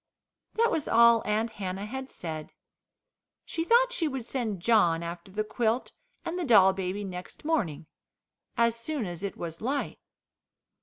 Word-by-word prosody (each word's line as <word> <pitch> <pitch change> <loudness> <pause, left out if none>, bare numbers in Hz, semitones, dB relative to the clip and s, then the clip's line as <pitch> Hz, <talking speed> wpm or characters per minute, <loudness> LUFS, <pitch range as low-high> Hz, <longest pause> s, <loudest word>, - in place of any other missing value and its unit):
That 465 +1 +3
was 310 - -1
all 235 0 +6
Aunt 220 +2 0
Hannah 190 +1 -3
had 265 +4 -6
said. 155 -3 -6 0.9
She 330 - -2
thought 485 +6 +4
she 360 -10 0
would 265 -5 -4
send 230 -7 -2
John 170 -5 +3
after 170 +2 -7
the 215 +2 -1
quilt 225 +2 -1 0.3
and 345 +2 -3
the - - -1
doll 195 - +6
baby 190 +2 -3
next 180 +6 -8
morning 200 - 0 0.7
as 235 0 +3
soon 245 +1 -3
as 175 -2 -6
it 200 -1 -4
was 165 -1 -6
light. 275 +5 -2
220 Hz, 155 wpm, -28 LUFS, 185-265 Hz, 0.9 s, all